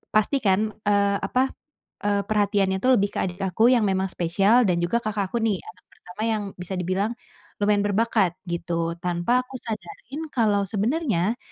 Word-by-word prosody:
pasti 215 +6 +3
kan, 215 0 +2 0.2
eee, 200 -1 +3
apa, 260 +1 0 0.5
eee, 205 -1 +2
perhatiannya 200 -2 +1
tu 260 - +4
lebih 200 -5 +3
ke - - -1
adik 180 +1 -4
aku 220 +7 +3
yang 230 -5 +3
memang 190 0 0
spesial 195 +7 +3
dan 175 -1 +1
juga 230 +7 +1
kakakku 215 0 -2
nih, 215 -4 0
anak 185 0 -14
pertama 180 +4 -12
yang 215 -2 0 0.2
bisa 180 +2 -5
dibilang 185 +5 -1 0.5
lumayan 205 0 +3
berbakat, 205 -4 +1
gitu. 170 0 -2
Tanpa 180 +8 +1
aku 265 - -10
sadarin 285 - -7
kalau 205 -4 +2
sebenarnya 220 - 0
205 Hz, 160 wpm, -24 LUFS, 185-225 Hz, 0.5 s, tu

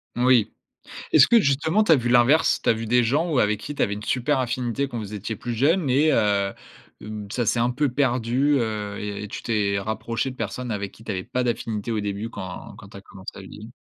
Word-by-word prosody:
Oui. 125 -2 +3 0.6
Est-ce 145 - +7
que 235 - +6
justement 160 +5 +2
tu 210 - +2
as 160 - +8
vu 120 -2 -1
l'inverse? 125 +6 +4
Tu - - 0
as - - +6
vu 115 +1 -5
des 125 +2 +3
gens 145 +9 +1
où 140 - +2
avec 105 -2 +1
qui 145 +6 -7
tu - - -2
avais 100 - +1
une 105 - -7
super 130 +5 0
affinité 125 +2 -1
quand 120 - -6
vous 105 -1 -7
étiez 105 +2 -4
plus 120 +4 -5
jeunes 145 +6 +2
et 150 +5 +3
heu, 100 -2 +1 0.5
mmh, 105 -1 -7
ça 120 -1 -1
s'est 115 - +1
un 120 +1 +2
peu 145 +3 0
perdu, 130 +2 +1
heu 105 -3 -3
et 105 0 -5
et - - -6
tu 105 - -7
t'es 100 -3 0
rapproché 110 +5 -3
de - - -12
personnes 125 -2 -4
avec 100 -2 -3
qui 110 - -17
tu 105 - -4
avais 95 -1 -3
pas 125 +1 -2
d'affinité 115 -2 -2
au 110 - -1
début 105 +2 -3
quand 95 -4 -8
quand 100 - -13
tu 100 - -11
as - - -10
commencé 95 -1 -10
à - - -8
vieillir? 105 +4 -11
115 Hz, 245 wpm, -24 LUFS, 105-130 Hz, 0.6 s, as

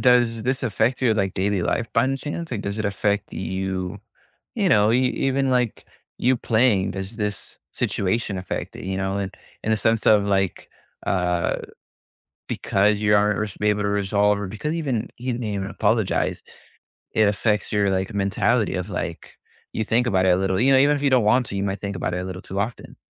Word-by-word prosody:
Does 120 -3 +3
this 130 +2 -1
affect 120 +1 0
your, 115 -4 +4
like, 95 -3 0
daily 100 -1 0
life 115 - -1
by - - +4
any 135 +1 0
chance, 165 +4 -5
like, 115 -5 -2
does 100 +2 -3
it 110 - -2
affect 100 +1 -1
you 95 0 -3 0.6
you 205 -6 +1
know, 105 -8 +4
e 125 +1 +3
even, 135 +1 0
like, 125 -3 0 0.3
you 130 +1 +3
playing, 110 -5 +2
does 95 +3 -6
this 105 -3 -4
situation 100 +1 -1
affect 95 - -5
it, - - -9
you 95 0 -2
know, 95 0 -1
and 95 -1 -3 0.3
in 110 - 0
a - - +3
sense 110 +2 +1
of, 105 -2 +6
like, 95 -2 0 0.4
uh, 90 -3 +1 0.9
because 105 +2 +1
you 105 -1 +3
aren't 105 0 +2
res 105 -2 -3
be 105 - +1
able 105 0 0
to 100 - 0
resolve 100 0 +2
or 100 - -4
because 130 - -3
even 135 -9 -2
he 125 - -10
didn't 120 0 -4
even 100 -2 -2
apologize, - - 0 0.7
it 110 -2 +4
affects 105 +1 0
your, 100 -1 +2
like, 95 +3 -1
mentality 100 +3 +1
of, 90 +2 -3
like 85 -2 -5 0.4
you 110 - -1
think 120 +3 +1
about 95 -5 +2
it - - +5
a 90 - +5
little, 95 0 0
you 135 +3 +4
know, 135 - +6
even 145 +2 +4
if 145 - -5
you 140 - +3
don't 125 -4 +4
want 125 +4 +4
to, - - -6
you 100 - -1
might 100 0 -2
think 100 -1 -3
about 90 0 -2
it 90 - -2
a - - -5
little 95 0 -6
too 95 - -6
often. 110 +3 -5
105 Hz, 210 wpm, -23 LUFS, 95-120 Hz, 0.9 s, of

